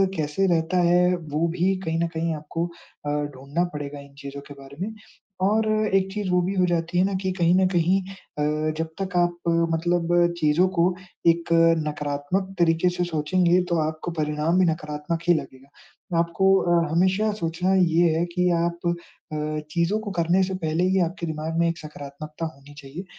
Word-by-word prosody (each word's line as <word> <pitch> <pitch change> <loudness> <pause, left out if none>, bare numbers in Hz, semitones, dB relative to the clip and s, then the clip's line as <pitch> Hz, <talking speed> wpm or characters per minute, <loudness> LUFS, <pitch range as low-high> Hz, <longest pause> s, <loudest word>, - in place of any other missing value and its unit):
कैसे 155 +4 0
रहता 170 +1 +1
है 180 +1 +4
वो 155 0 -1
भी 190 +2 +2
कहीं 165 0 -1
न - - +1
कहीं 165 0 0
आपको 155 +3 -3
अ, 170 -3 -11 0.3
ढूँढ़ना 140 +6 -2
पड़ेगा 145 -1 -5
इन 140 0 -14
चीज़ों 140 -1 -7
के 145 - -9
बारे 135 +1 -13
में। 220 - -6 0.5
और 215 +3 +2 0.3
एक 195 0 +2
चीज़ 205 -2 -3
वो 180 0 +3
भी 185 +3 -1
हो 185 -1 +3
जाती 170 0 -1
है 180 - +5
ना 200 - -1
कि 190 -1 -1
कहीं 170 0 +4
न 190 0 +4
कहीं 180 +2 +2
अ, 195 +1 -10 0.6
जब 160 0 -1
तक 190 -1 -4
आप 175 0 +2 0.4
मतलब 175 +1 +2
चीज़ों 155 +4 +3
को 175 +2 +3 0.3
एक 170 0 +3 0.4
नकारात्मक 150 +6 -2
तरीके 165 +1 +3
से 180 0 -2
सोचेंगे 175 +2 +2
तो 170 - +1
आपको 160 +2 -5
परिणाम 150 +3 +1
भी 185 - +5
नकारात्मक 155 0 -2
ही 175 - +7
लगेगा। 135 -4 -5 0.4
तो 170 - +1
आपको 170 +3 +3
अ, 170 -2 +2
हमेशा 190 +6 +2
सोचना 170 +3 0
ये 175 -2 +4
है 170 - +1
कि 180 0 +2
आप 170 0 -2 0.5
अ, 155 0 -2
चीज़ों 170 +6 +1
को 210 -2 -5
करने 175 +3 +3
से 190 +1 -2
पहले 160 +3 +1
ही 190 +1 +2
आपके 170 -1 -6
दिमाग 160 +1 -3
में 170 - +3
एक 165 - -3
सकारात्मकता 155 +1 -7
होनी 140 +1 -16
चाहिए। 140 +7 -8
170 Hz, 185 wpm, -24 LUFS, 155-180 Hz, 0.6 s, ही